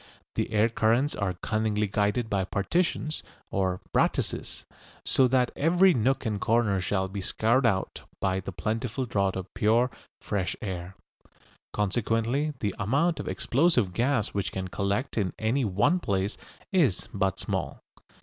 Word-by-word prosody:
The - - -2
air 110 +1 +4
currents 115 +5 +2
are 95 -3 -1
cunningly 110 +2 0
guided 105 +4 0
by 100 -3 0
partitions 155 - -1 0.3
or 95 -1 0
"brattices," - - 0 0.4
so 130 - +4
that 125 -1 +2
every 175 +5 +4
nook 130 +2 +1
and 105 -3 -1
corner 110 -4 +2
shall 95 +1 0
be 95 +1 -5
scoured 115 +6 +2
out 95 -4 -1 0.2
by 95 0 0
the 95 - -6
plentiful 115 +6 -2
draught 100 -5 0
of 95 0 -6
pure 115 +3 +3 0.3
fresh 100 -3 -2
air. 95 -2 -5 0.8
Consequently 115 +7 0
the 100 -3 0
amount 145 - +1
of - - -5
explosive 125 - +2
gas 120 +1 +1
which 100 -1 -2
can 95 -1 -4
collect 100 +7 -1
in 95 -3 -1
any 115 +5 +1
one 105 - +2
place 100 - -1 0.4
is 160 - +2
but 95 -2 0
small. - - -3
110 Hz, 145 wpm, -27 LUFS, 95-125 Hz, 0.8 s, air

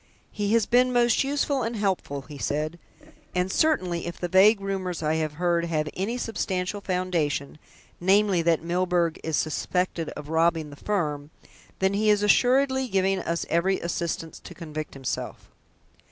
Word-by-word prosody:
"He 205 0 -1
has 230 -3 +4
been 250 +1 +3
most 240 0 +3
useful 280 0 0
and 230 0 -2
helpful," 190 -9 -2
he 145 0 -11
said. 155 +5 -2 0.6
"And 180 +1 0
certainly, 185 - +1
if 170 - -6
the 175 - -2
vague 195 +4 +5
rumours 190 -4 -3
I 155 +1 +1
have 155 -2 -2
heard 170 +1 +1
have 155 -2 -1
any 210 +6 -2
substantial 195 -3 -2
foundation 170 -7 -1 0.4
namely, 195 0 +3
that 165 -1 +2
Milburgh 175 -1 0
is 160 -2 -1
suspected 170 +1 -1
of 150 - -8
robbing 160 -1 +1
the - - -10
firm 150 -6 -2 0.5
then 190 +1 +1
he 215 +2 +2
is 210 -1 +3
assuredly 265 +4 +3
giving 195 -2 +1
us 170 0 -2
every 180 +4 +1
assistance 170 -1 -3
to - - -12
convict 155 -3 -6
himself." 135 -2 -5
180 Hz, 155 wpm, -26 LUFS, 160-205 Hz, 0.6 s, vague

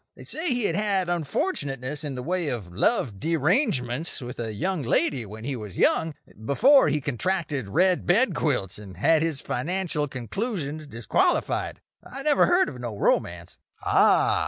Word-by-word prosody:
They - - -12
say 320 +3 -4
he 245 -3 0
had 165 - 0
had 200 -3 0
unfortunateness 145 - -2
in 145 -3 -4
the 125 - -5
way 180 +1 -1
of 105 -10 -4
love 100 +2 0
derangements 160 - 0
with 125 -2 -8
a 115 -2 -3
young 180 - -2
lady 130 -2 0
when 110 +2 -9
he 135 +2 -3
was 105 -6 -8
young; 160 -2 +2 0.3
before 260 - +5
he 150 0 +1
contracted 145 - -2
red 180 - +2
bed 205 +3 +3
quilts 115 - -1
and 95 -4 -11
had 160 - +3
his 160 -4 -1
financial 160 +2 -2
conclusions 155 - -4
disqualified. 115 -4 0 0.2
I 275 +1 -9
never 300 -2 +4
heard 355 +2 +4
of 125 - -7
no 115 -4 -5
romance." 85 -3 -1 0.3
"Ah!" - - +4
150 Hz, 160 wpm, -25 LUFS, 120-185 Hz, 0.3 s, before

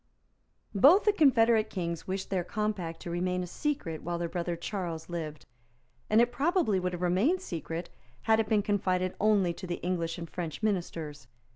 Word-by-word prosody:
Both 285 - +7
the 420 - +4
confederate 230 - +4
Kings 170 -5 -4
wished 190 +1 -3
their 185 -2 +1
compact 190 -4 -3
to 170 - -6
remain 180 +1 -1
a - - -3
secret 180 - -3
while 175 0 -3
their 170 0 -2
brother 175 0 -2
Charles 170 -3 -4
lived; 155 -3 -5 0.6
and 215 - +5
it 240 +1 +4
probably 285 - +2
would 180 0 -2
have 175 0 -4
remained 200 - +2
secret, 170 - -5 0.3
had 220 0 +4
it 220 - 0
been 210 -2 +3
confided 185 -3 0
only 200 -5 +3
to 185 +2 -8
the 175 - -2
English 170 -2 -1
and 170 -1 -6
French 165 +1 -5
Ministers. 165 - -2
185 Hz, 175 wpm, -30 LUFS, 170-215 Hz, 0.6 s, Both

